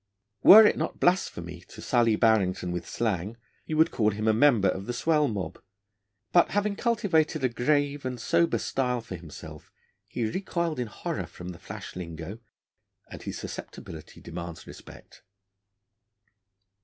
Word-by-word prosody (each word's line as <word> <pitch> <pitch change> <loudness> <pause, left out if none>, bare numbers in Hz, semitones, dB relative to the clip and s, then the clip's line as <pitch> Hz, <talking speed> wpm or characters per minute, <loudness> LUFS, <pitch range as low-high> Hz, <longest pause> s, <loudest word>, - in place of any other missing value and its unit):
Were 215 +2 +10
it - - +3
not - - -3
blasphemy 90 - 0
to - - -13
sully 115 -3 +2
Barrington 100 -6 +2
with 90 -1 -5
slang 105 -1 -2 0.3
you 155 - -2
would 160 +1 +4
call 110 -3 +2
him 110 +1 -3
a 110 - +5
member 115 -4 +4
of 95 +3 -4
the 120 - -2
swell 150 +3 +2
mob, 100 - -5 0.7
but, 175 - +5
having 205 0 0
cultivated 180 - +1
a 130 - +3
grave 145 +3 0
and 125 -1 -4
sober 170 +6 +2
style 125 -2 -1
for 110 -5 -8
himself, 80 -2 -11 0.4
he 120 - -3
recoiled 170 - -2
in 125 - -2
horror 105 - -5
from 90 0 -9
the 85 -2 -9
flash - - -9
lingo, 85 +3 -7 0.7
and - - -9
his - - -6
susceptibility 80 -2 -9
demands 85 -1 -8
respect. - - -14
115 Hz, 150 wpm, -27 LUFS, -, 0.7 s, Were